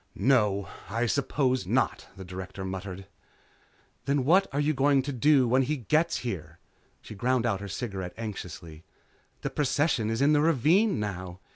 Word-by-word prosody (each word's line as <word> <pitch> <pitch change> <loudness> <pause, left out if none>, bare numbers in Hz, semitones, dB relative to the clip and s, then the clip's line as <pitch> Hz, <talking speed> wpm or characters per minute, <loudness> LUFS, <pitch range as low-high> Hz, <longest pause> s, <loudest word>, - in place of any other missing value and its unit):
"No, 105 -7 +2 0.2
I 115 +4 0
suppose 130 0 0
not," - - 0
the 95 - -8
Director 95 +1 -7
muttered. 95 0 -6 1.0
"Then 140 -2 +1
what 185 +6 +4
are 140 - -1
you 150 +1 +2
going 135 0 +3
to 140 +1 -4
do 135 +1 +4
when 130 +3 +3
he 150 +4 -1
gets 155 +7 +1
here?" 85 -8 -5 0.5
She - - -9
ground 120 +3 0
out 100 -4 0
her 100 - -6
cigarette 95 -1 -5
anxiously. 90 -7 -7 0.6
"The - - -3
procession 145 -5 +1
is 115 - -1
in 145 +2 +4
the 145 - +4
ravine 165 - +3
now. 95 -3 -5
120 Hz, 160 wpm, -28 LUFS, 95-140 Hz, 1.0 s, what